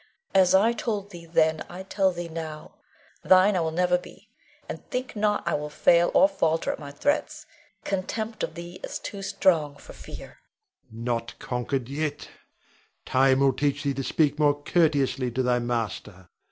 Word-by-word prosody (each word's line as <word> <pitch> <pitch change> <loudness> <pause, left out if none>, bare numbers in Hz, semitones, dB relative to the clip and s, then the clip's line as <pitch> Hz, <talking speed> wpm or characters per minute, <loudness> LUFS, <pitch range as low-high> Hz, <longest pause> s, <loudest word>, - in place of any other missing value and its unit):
As 190 -1 +5
I 220 +5 +4
told 210 -3 -3
thee 170 -1 -11
then, 160 -1 +2
I 180 +2 -7
tell 190 0 +1
thee 175 -1 -5
now, 160 -2 -7 0.5
thine 190 +2 +5
I - - +2
will 165 -1 0
never 180 +2 +2
be; - - -15 0.4
and - - -7
think 250 -1 -4
not 210 0 0
I - - +1
will 150 0 -2
fail 170 +3 +4
or 285 - +7
falter 165 - 0
at - - -6
thy 145 -2 -8
threats. 215 - -1 0.4
Contempt 215 +3 -3
of - - -3
thee 175 +1 -8
is - - -4
too 200 - -7
strong 170 -7 +1
for - - -13
fear. - - -11 0.5
Rod. 115 +1 -8
Not 115 -1 -2
conquered 125 0 -3
yet. 145 +1 -3 0.8
Time 130 +1 +3
will 135 -1 +4
teach 145 +2 -1
thee 140 -1 0
to 135 +1 -3
speak 150 +1 +1
more 145 -1 +3
courteously 145 -6 +2
to 130 +2 -1
thy 125 0 +2
master. 105 -6 -4
160 Hz, 175 wpm, -26 LUFS, 135-185 Hz, 0.8 s, or